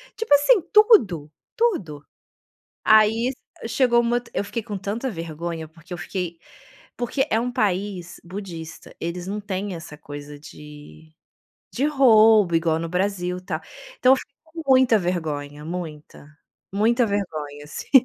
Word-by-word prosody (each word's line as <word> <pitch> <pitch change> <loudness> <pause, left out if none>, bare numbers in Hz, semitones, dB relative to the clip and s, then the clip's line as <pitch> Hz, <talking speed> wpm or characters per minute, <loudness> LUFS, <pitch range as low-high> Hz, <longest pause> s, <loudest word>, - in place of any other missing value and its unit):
tipo 450 -7 +1
assim, 290 +10 +5
tudo, 210 - +5 0.2
tudo. 185 - -1 0.8
Aí 220 +3 +5 0.4
chegou 240 0 +3
um - - +1
moto 240 +1 -1
eu - - 0
fiquei 230 +3 -4
com 210 -2 -5
tanta 210 +7 -3
vergonha, 165 -2 -5
porque 165 +3 -15
eu - - -7
fiquei 175 -1 -4 0.6
porque 265 +3 -1
é 220 - +3
um 245 +2 -2
país 195 -5 -2
budista 170 -3 -8
eles 175 +1 -4
não 205 +2 -3
têm 200 -1 -4
essa 165 -2 -9
coisa 145 0 -9
de 150 +1 -13 0.6
de 270 +4 0
roubo 220 - +5
igual 165 -1 +1
no 165 0 -4
Brasil 180 0 -1
tal, 185 - -4 0.4
então 255 +1 +6
eu - - +5
fiquei 280 - -11
com 325 +1 -9
muita 255 -3 +6
vergonha 150 -5 -3
muita, 160 -4 -7 0.5
muita 230 +4 +3
vergonha 155 -8 -4
assim. 150 - -9
190 Hz, 145 wpm, -23 LUFS, 165-235 Hz, 0.8 s, então